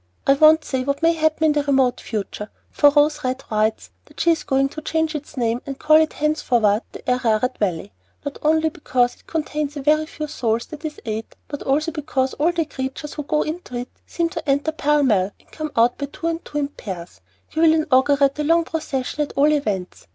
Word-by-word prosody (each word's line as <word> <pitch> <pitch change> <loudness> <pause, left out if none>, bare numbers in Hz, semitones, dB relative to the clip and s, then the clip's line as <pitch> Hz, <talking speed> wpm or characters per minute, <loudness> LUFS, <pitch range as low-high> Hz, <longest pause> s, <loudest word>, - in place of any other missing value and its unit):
I 275 - +6
won't 310 +2 +5
say 260 -2 -1
what 280 +3 -2
may 330 +1 +5
happen 315 0 0
in 315 - +5
the 295 0 +1
remote 270 -3 +2
future, 210 0 -5 0.2
for 290 - +5
Rose 295 +1 +2
Red 255 +1 -2
writes 215 +1 0
that - - -16
she 335 - +4
is 330 - 0
going 270 0 +2
to 310 - -8
change 320 0 -1
its 300 -1 -7
name 235 0 0
and 275 -1 -6
call 310 +2 +5
it 315 0 +2
henceforward 240 -8 +1
'The - - -12
Ararat 250 -1 +1
Valley,' 170 - -1 0.3
not 285 - -5
only 315 +1 +3
because 250 -5 0
it - - -27
contains 300 -2 -3
'a 305 +2 +2
few 305 -1 -5
souls, 235 -6 -1
that 305 -1 -10
is 300 -1 -5
eight,' 220 0 -5
but 290 - -6
also 305 +4 0
because 275 -4 -1
all 315 +4 +1
the 335 -2 -1
creatures 270 +1 -5
who 300 - -4
go 300 +1 0
into 310 -5 -6
it 245 +1 -4 0.2
seem 340 -1 -1
to 330 -4 -5
enter 285 +3 +2
pell 295 -1 +2
mell 205 -6 +2
and - - -28
come 310 -1 -5
out 235 +2 +3
two 280 - -2 0.2
by 330 0 0
two 295 - -6
in 285 -1 0
pairs. 185 -10 -8 0.3
You 320 - -1
will 325 -1 +6
inaugurate 280 -2 +3
the 300 - -3
long 335 +3 +3
procession 300 -4 -3
at 295 - -2
all 290 +2 +4
events! 200 - -3
285 Hz, 215 wpm, -21 LUFS, 250-310 Hz, 0.3 s, I